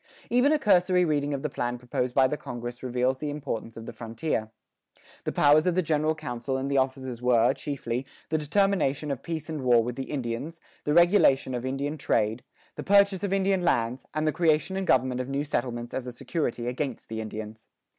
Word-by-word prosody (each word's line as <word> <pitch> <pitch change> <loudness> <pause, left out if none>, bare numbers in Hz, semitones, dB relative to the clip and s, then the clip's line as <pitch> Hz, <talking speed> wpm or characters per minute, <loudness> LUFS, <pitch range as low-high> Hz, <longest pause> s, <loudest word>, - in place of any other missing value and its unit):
Even 250 +4 +4
a 310 - +4
cursory 185 -7 +3
reading 145 -2 0
of 140 -1 -3
the 150 - -1
plan 120 -1 -2
proposed 125 0 -3
by 130 -1 +5
the 150 - -2
congress 120 -3 -7
reveals 125 +1 0
the 150 - -3
importance 115 -6 -5
of 115 - -8
the - - -7
frontier. 115 0 -3 0.8
The - - 0
powers 150 +3 +4
of 180 - +2
the 185 - +2
general 155 0 +1
council 130 -2 -4
and 135 +1 -3
the 140 - +3
officers 130 -2 -2
were, 120 -1 +4
chiefly, 130 -3 -4 0.2
the 155 0 +1
determination 150 -4 +1
of 135 - -3
peace 160 -2 -5
and 155 -3 -4
war 120 -3 +4
with 120 +1 -4
the 135 - -5
Indians, 140 +4 -4 0.3
the 150 - +1
regulation 175 -7 +5
of 125 +1 -3
Indian 140 +3 -3
trade, 110 -1 0 0.3
the - - -4
purchase 200 -1 +4
of 200 - -1
Indian 195 -1 +2
lands, 120 -6 0
and 155 0 -1
the 155 - +3
creation 160 +2 +1
and 190 0 -2
government 130 0 +2
of 125 - -6
new 140 +1 -1
settlements 120 -4 -3
as 130 -1 -3
a - - -4
security 120 -2 -3
against 125 0 -3
the 110 0 -4
Indians. 110 0 -8
135 Hz, 205 wpm, -27 LUFS, 120-155 Hz, 0.8 s, by